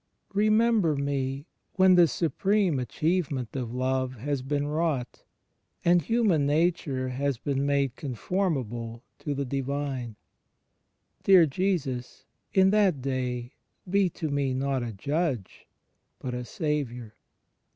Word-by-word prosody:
Remember 215 Hz, -4 st, +3 dB
me, 140 Hz, 0 st, -2 dB, 0.3 s
when 190 Hz, -1 st, +5 dB
the 175 Hz, -2 st, +7 dB
supreme 180 Hz, +1 st, +1 dB
achievement 140 Hz, -2 st, -1 dB
of 125 Hz, -4 st, -3 dB
love 130 Hz, +1 st, -1 dB
has 135 Hz, +3 st, -2 dB
been 145 Hz, +2 st, -1 dB
wrought, 150 Hz, -4 st, -2 dB, 0.6 s
and 175 Hz, 0 st, +5 dB
Human 190 Hz, -7 st, +2 dB
Nature 150 Hz, -4 st, +1 dB
has 135 Hz, 0 st, -1 dB
been 140 Hz, +2 st, -1 dB
made 140 Hz, -3 st, +1 dB
conform 160 Hz, -, -1 dB
able 115 Hz, -1 st, -6 dB, 0.2 s
to 145 Hz, -2 st, -3 dB
the 140 Hz, 0 st, -2 dB
Divine.... 135 Hz, -3 st, -3 dB, 1.1 s
Dear 185 Hz, -4 st, +7 dB
Jesus, 135 Hz, -7 st, -2 dB, 0.3 s
in 190 Hz, 0 st, +5 dB
that 195 Hz, -10 st, +3 dB
day 125 Hz, -2 st, -2 dB, 0.3 s
be 195 Hz, 0 st, +3 dB
to 160 Hz, -1 st, -4 dB
me 140 Hz, -2 st, 0 dB
not 135 Hz, 0 st, 0 dB
a 120 Hz, -1 st, -3 dB
Judge, 135 Hz, -, -2 dB, 0.5 s
but 125 Hz, -, -5 dB
a 125 Hz, 0 st, -4 dB
Saviour!" 125 Hz, -8 st, -3 dB
140 Hz, 120 wpm, -27 LUFS, 130-170 Hz, 1.1 s, the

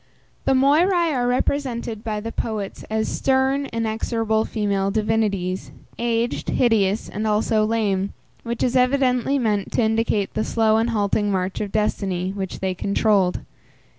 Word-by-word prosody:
The -, -, +3 dB
Moiræ 325 Hz, +5 st, +3 dB
are 245 Hz, -2 st, 0 dB
represented 245 Hz, -3 st, -1 dB
by 215 Hz, -2 st, -2 dB
the 225 Hz, +1 st, -5 dB
poets 215 Hz, -5 st, -4 dB
as 220 Hz, 0 st, 0 dB
stern, 270 Hz, +1 st, +1 dB
inexorable 225 Hz, -1 st, -1 dB
female 200 Hz, -3 st, -1 dB
divinities, 205 Hz, -3 st, -1 dB, 0.3 s
aged, 235 Hz, 0 st, -1 dB
hideous, 215 Hz, -4 st, +2 dB
and 215 Hz, +1 st, -3 dB
also 215 Hz, +1 st, +2 dB
lame, 205 Hz, -3 st, 0 dB, 0.3 s
which 235 Hz, 0 st, -3 dB
is 250 Hz, 0 st, +1 dB
evidently 255 Hz, +1 st, +2 dB
meant 210 Hz, -6 st, 0 dB
to 240 Hz, -, +2 dB
indicate 220 Hz, -2 st, 0 dB
the 215 Hz, -, 0 dB
slow 220 Hz, -1 st, +2 dB
and 225 Hz, +1 st, +1 dB
halting 205 Hz, -1 st, +1 dB
march 185 Hz, 0 st, -1 dB
of 205 Hz, -2 st, -3 dB
destiny, 190 Hz, -4 st, -1 dB
which 195 Hz, -2 st, -5 dB
they 190 Hz, -1 st, 0 dB
controlled. 200 Hz, -1 st, +1 dB
220 Hz, 140 wpm, -22 LUFS, 205-240 Hz, 0.3 s, The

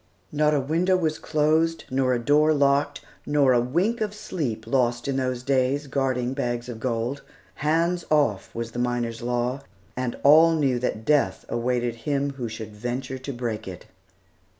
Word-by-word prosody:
Not 150 Hz, 0 st, +2 dB
a -, -, +2 dB
window 170 Hz, +7 st, +1 dB
was 155 Hz, -3 st, -1 dB
closed, 160 Hz, +2 st, +1 dB
nor 130 Hz, -1 st, +2 dB
a -, -, +1 dB
door 150 Hz, +5 st, +3 dB
locked, 140 Hz, 0 st, +2 dB, 0.2 s
nor 145 Hz, -3 st, +3 dB
a 120 Hz, -, +4 dB
wink 180 Hz, -, 0 dB
of 210 Hz, -1 st, -2 dB
sleep 140 Hz, -, -4 dB
lost 120 Hz, -1 st, 0 dB
in 140 Hz, -, -1 dB
those 130 Hz, -2 st, -2 dB
days, 135 Hz, +2 st, +1 dB
guarding 130 Hz, -2 st, -1 dB
bags 120 Hz, -3 st, -2 dB
of 120 Hz, -3 st, -7 dB
gold. 120 Hz, +3 st, -2 dB, 0.4 s
"Hands 165 Hz, +3 st, +1 dB
off" 145 Hz, -10 st, +2 dB
was 115 Hz, 0 st, -4 dB
the 120 Hz, -, -5 dB
miners' 120 Hz, -1 st, -1 dB
law, 125 Hz, +2 st, -1 dB, 0.3 s
and 125 Hz, -1 st, -3 dB
all 160 Hz, +3 st, +7 dB
knew 135 Hz, -5 st, +1 dB
that 110 Hz, -3 st, -3 dB
death 140 Hz, -10 st, +1 dB
awaited 120 Hz, 0 st, -1 dB
him 140 Hz, +4 st, -1 dB
who 125 Hz, -4 st, -5 dB
should 110 Hz, -1 st, -8 dB
venture 125 Hz, +4 st, -4 dB
to 135 Hz, +2 st, -6 dB
break 120 Hz, -5 st, -4 dB
it. 90 Hz, -2 st, -8 dB
130 Hz, 170 wpm, -25 LUFS, 120-150 Hz, 0.4 s, all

